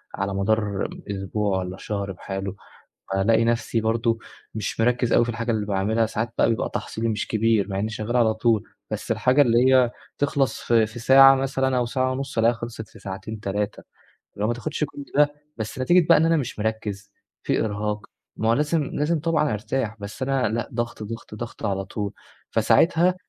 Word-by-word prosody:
على 100 Hz, 0 st, -2 dB
مدار 100 Hz, 0 st, 0 dB, 0.2 s
أسبوع 100 Hz, 0 st, -1 dB
والّا 90 Hz, 0 st, -5 dB
شهر 100 Hz, -1 st, -4 dB
بحاله، 95 Hz, +1 st, -5 dB, 0.6 s
فالاقي 110 Hz, +4 st, +3 dB
نفْسي 115 Hz, -1 st, 0 dB
برضه 115 Hz, +1 st, +1 dB, 0.4 s
مش 110 Hz, +1 st, -3 dB
مركز 120 Hz, +1 st, +2 dB
أوي 120 Hz, -, +5 dB
في 120 Hz, -, -5 dB
الحاجة 115 Hz, +1 st, -2 dB
اللي 110 Hz, -2 st, -1 dB
باعملها، 105 Hz, +3 st, +1 dB
ساعات 110 Hz, +1 st, -3 dB
بقى -, -, +4 dB
بيبقى 115 Hz, -, 0 dB
تحصيلي 115 Hz, +1 st, -3 dB
مش 105 Hz, -2 st, -2 dB
كبير 110 Hz, -2 st, +2 dB
مع 95 Hz, 0 st, -2 dB
إنّي 110 Hz, -, -1 dB
شغّال 110 Hz, +3 st, -2 dB
على 110 Hz, -2 st, +4 dB
طول، 110 Hz, -1 st, +2 dB, 0.3 s
بس -, -, -3 dB
الحاجة 130 Hz, +3 st, +3 dB
اللي 120 Hz, -4 st, +4 dB, 0.2 s
هي 125 Hz, -2 st, +5 dB, 0.3 s
تخلص 140 Hz, -1 st, 0 dB
في 115 Hz, -2 st, +3 dB
في 110 Hz, +2 st, -9 dB
ساعة 135 Hz, +3 st, +8 dB
مثلًا 130 Hz, -1 st, 0 dB
أو 125 Hz, -, +2 dB
ساعة 130 Hz, +2 st, 0 dB
ونُص 135 Hz, -2 st, -4 dB
ألاقيها 115 Hz, +1 st, +4 dB
خلصت 115 Hz, -2 st, -7 dB
في -, -, -15 dB
ساعتين، 100 Hz, +3 st, -6 dB
تلاتة 105 Hz, 0 st, -3 dB, 0.5 s
اللي 100 Hz, -, -3 dB
هو 110 Hz, -, +2 dB
ما 120 Hz, -, +1 dB
تاخدش 150 Hz, +5 st, -2 dB
كل 140 Hz, -1 st, -8 dB
ده، 145 Hz, 0 st, +4 dB, 0.2 s
بس 110 Hz, +2 st, -5 dB
نتيجة 170 Hz, +6 st, +4 dB
بقى -, -, +8 dB
إن 160 Hz, -, +3 dB
أنا 165 Hz, 0 st, +3 dB
مش 135 Hz, -7 st, -3 dB
مركز 105 Hz, -2 st, -3 dB, 0.3 s
في -, -, +1 dB
إرهاق، 105 Hz, 0 st, -2 dB, 0.4 s
ما 110 Hz, -, 0 dB
هو -, -, +5 dB
لازم 150 Hz, +5 st, +1 dB
لازم 150 Hz, +3 st, -1 dB
طبعًا 155 Hz, -4 st, +1 dB
أرتاح، 110 Hz, +1 st, -2 dB
بس 100 Hz, +5 st, -7 dB
أنا 130 Hz, -3 st, +1 dB
لأ 115 Hz, +2 st, -2 dB
ضغط، 120 Hz, -1 st, -3 dB
ضغط، 110 Hz, 0 st, -7 dB
ضغط 120 Hz, +1 st, -7 dB
على 95 Hz, -1 st, -1 dB
طول، 100 Hz, 0 st, -4 dB, 0.4 s
فساعتها 175 Hz, +2 st, +4 dB
115 Hz, 190 wpm, -24 LUFS, 105-130 Hz, 0.6 s, ساعة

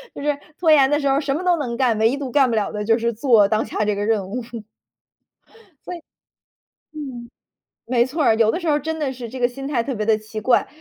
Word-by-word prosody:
就 280 Hz, -, -7 dB
是 295 Hz, -1 st, +1 dB, 0.2 s
拖 330 Hz, -3 st, +3 dB
延 275 Hz, -3 st, +6 dB
的 295 Hz, +1 st, +2 dB
时 280 Hz, -, -1 dB
候 275 Hz, +1 st, +2 dB
什 280 Hz, -2 st, -2 dB
么 355 Hz, -, -3 dB
都 355 Hz, -1 st, +3 dB
能 245 Hz, -6 st, -4 dB
干， 245 Hz, -3 st, +2 dB
唯 230 Hz, +5 st, +2 dB
独 270 Hz, -3 st, -5 dB
干 270 Hz, -2 st, +3 dB
不 230 Hz, -, 0 dB
了 210 Hz, -2 st, -1 dB
的 210 Hz, 0 st, -4 dB
就 225 Hz, +2 st, +2 dB
是 235 Hz, 0 st, -1 dB
做 225 Hz, -3 st, +4 dB
当 215 Hz, +1 st, 0 dB
下 215 Hz, 0 st, -2 dB
这 210 Hz, -, +1 dB
个 205 Hz, -, -2 dB
任 210 Hz, -3 st, 0 dB
务。 245 Hz, +6 st, -4 dB, 1.5 s
所 360 Hz, -, -5 dB
以， 340 Hz, -, -11 dB, 0.9 s
嗯， 255 Hz, -6 st, -7 dB, 0.6 s
没 240 Hz, -1 st, +2 dB
错 290 Hz, +3 st, -2 dB
儿， 225 Hz, -, +4 dB
有 220 Hz, -1 st, +3 dB
的 -, -, -2 dB
时 345 Hz, -, -7 dB
候 295 Hz, -, +3 dB
儿 295 Hz, -, 0 dB
真 320 Hz, +1 st, -4 dB
的 280 Hz, -3 st, -2 dB
是 245 Hz, -2 st, -8 dB
这 255 Hz, -, -8 dB
个 245 Hz, -, +3 dB
心 270 Hz, +3 st, -7 dB
态 245 Hz, -5 st, 0 dB
特 270 Hz, -, -3 dB
别 215 Hz, -2 st, -3 dB
地 220 Hz, -1 st, +2 dB
奇 215 Hz, 0 st, -8 dB
怪。 240 Hz, +3 st, +2 dB
250 Hz, 280 characters per minute, -21 LUFS, 225-285 Hz, 1.5 s, 延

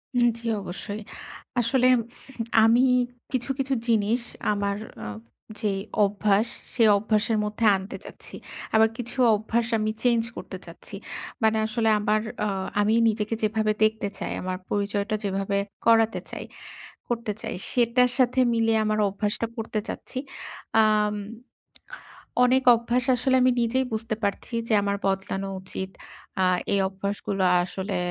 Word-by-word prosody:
হুম 240 Hz, -1 st, +5 dB
জি, -, -, -12 dB, 0.2 s
অবশ্যই। 195 Hz, +3 st, -6 dB, 0.6 s
আসলে 250 Hz, +2 st, +3 dB, 0.8 s
আমি 230 Hz, +2 st, +5 dB, 0.5 s
কিছু, 255 Hz, 0 st, -2 dB
কিছু 270 Hz, 0 st, 0 dB
জিনিস 225 Hz, +1 st, +2 dB, 0.3 s
আমার 200 Hz, -1 st, -1 dB, 0.3 s
অ -, -, -5 dB, 0.6 s
যে 210 Hz, -2 st, +1 dB, 0.3 s
অভ্যাস, 205 Hz, +2 st, +1 dB, 0.3 s
সে 240 Hz, -, -1 dB, 0.2 s
অভ্যাসের 215 Hz, +1 st, +1 dB
মধ্যে 210 Hz, +2 st, -2 dB
আনতে 190 Hz, +4 st, -6 dB
চাচ্ছি। -, -, -11 dB, 0.4 s
আবার 220 Hz, 0 st, +6 dB
কিছু 245 Hz, +1 st, -5 dB, 0.2 s
অভ্যাস 225 Hz, +2 st, -1 dB
আমি 215 Hz, 0 st, 0 dB
চেঞ্জ 235 Hz, -2 st, +3 dB
করতে -, -, -7 dB
চাচ্ছি। -, -, -11 dB, 0.5 s
মানে 220 Hz, 0 st, +3 dB
আসলে 225 Hz, 0 st, 0 dB
আমার 210 Hz, +1 st, +1 dB, 0.2 s
আ -, -, +1 dB, 0.3 s
আমি 210 Hz, +1 st, +2 dB, 0.2 s
নিজেকে 215 Hz, 0 st, -1 dB
যেভাবে 215 Hz, 0 st, +1 dB
দেখতে 215 Hz, -1 st, +1 dB
চাই, -, -, -4 dB
আমার 185 Hz, 0 st, -3 dB
পরিচয়টা 205 Hz, +1 st, -1 dB
যেভাবে 195 Hz, 0 st, -1 dB, 0.3 s
করাতে 225 Hz, -1 st, +4 dB
চাই -, -, -6 dB, 0.6 s
করতে 230 Hz, -3 st, -2 dB
চাই, -, -, -4 dB, 0.2 s
সেটার 245 Hz, +1 st, +3 dB
সাথে 255 Hz, 0 st, +3 dB
মিলিয়ে 225 Hz, -1 st, +2 dB
আমার 215 Hz, 0 st, 0 dB
অভ্যাসটা 210 Hz, +3 st, -2 dB
করতে 225 Hz, -1 st, -3 dB
চাচ্ছি। 255 Hz, -, -6 dB, 0.6 s
আম 210 Hz, -1 st, +3 dB, 1.3 s
অনেক 255 Hz, +1 st, +4 dB
অভ্যাস 235 Hz, +2 st, 0 dB
আসলে 260 Hz, +2 st, +1 dB
আমি 255 Hz, -, +5 dB
নিজেই 255 Hz, +3 st, +1 dB
বুঝতে 220 Hz, 0 st, -2 dB
পারছি 200 Hz, +4 st, -2 dB
যে 225 Hz, -, +1 dB
আমার 200 Hz, 0 st, 0 dB
বদলানো 195 Hz, 0 st, -1 dB
উচিত। 190 Hz, 0 st, -5 dB, 0.5 s
আ -, -, +4 dB, 0.3 s
এই 200 Hz, -, +3 dB
অভ্যাসগুলো 195 Hz, 0 st, -3 dB, 0.2 s
আসলে 190 Hz, +1 st, -4 dB
220 Hz, 135 wpm, -25 LUFS, 205-235 Hz, 1.3 s, আবার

